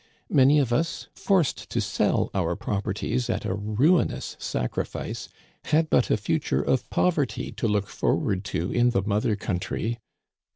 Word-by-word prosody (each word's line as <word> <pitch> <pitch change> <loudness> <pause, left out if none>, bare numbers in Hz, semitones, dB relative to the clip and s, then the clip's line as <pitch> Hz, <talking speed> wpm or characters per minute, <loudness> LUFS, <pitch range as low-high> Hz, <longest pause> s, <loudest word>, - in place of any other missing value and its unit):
Many 140 +2 +6
of 130 -5 +2
us, 165 +6 -1
forced 190 -7 0
to - - -1
sell - - +1
our 85 -3 0
proper 105 0 -2
ties 120 +5 -2
at - - -1
a - - -1
ruinous 110 - +1
sacrifice, - - -3 0.4
had 155 +1 +2
but 125 - +3
a - - +3
future 150 +9 0
of 125 -2 0
poverty 150 -10 0
to 115 - -2
look 105 -1 +1
forward 95 -1 0
to 90 +1 -2
in 120 0 +3
the 95 -5 +1
mother 105 +1 +1
country. 105 +4 -3
115 Hz, 155 wpm, -26 LUFS, 100-140 Hz, 0.4 s, Many